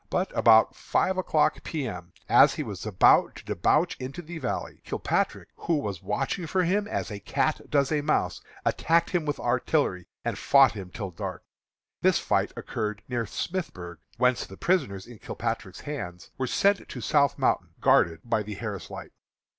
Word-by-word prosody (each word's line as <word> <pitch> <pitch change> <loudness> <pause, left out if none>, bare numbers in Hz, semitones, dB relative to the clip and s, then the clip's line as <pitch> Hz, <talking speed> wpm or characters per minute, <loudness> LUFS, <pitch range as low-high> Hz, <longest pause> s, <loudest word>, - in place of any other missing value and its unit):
But 185 +1 -1
about 110 -1 +6
five 190 - 0
o'clock 155 -4 +1
P. 150 -5 -3
M., 90 -4 -7 0.2
as - - +6
he - - -2
was - - -6
about - - +4
to - - -12
debouch 150 - +2
into 135 +7 -6
the 165 +1 -7
valley, - - -4
Kilpatrick, - - -1
who 165 -2 0
was 100 - -4
watching 135 - -2
for 185 +3 +1
him 200 +4 +1
as 205 - -3
a 105 - -5
cat - - -1
does 140 -1 +2
a 150 -1 +1
mouse, 150 +1 0 0.2
attacked 170 +1 +2
him 175 -4 0
with 145 - -1
artillery 120 - 0 0.2
and - - -2
fought 135 -3 +6
him 95 -4 -8
till 100 0 -6
dark. 85 - -6 0.6
This - - +4
fight - - 0
occurred 105 -1 -4
near 120 -2 -1
Smithburg, 95 - -5 0.2
whence 125 0 +2
the 95 - -12
prisoners 100 - 0
in 120 -3 -13
Kilpatrick's 95 - -4
hands 100 -13 -6
were 130 - -2
sent 200 +8 +2
to - - -6
South 140 -2 +2
Mountain, - - 0
guarded 80 -1 +3
by 115 -2 0
the 105 0 -6
Harris 105 -3 -5
Light. - - -8
130 Hz, 175 wpm, -27 LUFS, 100-160 Hz, 0.6 s, about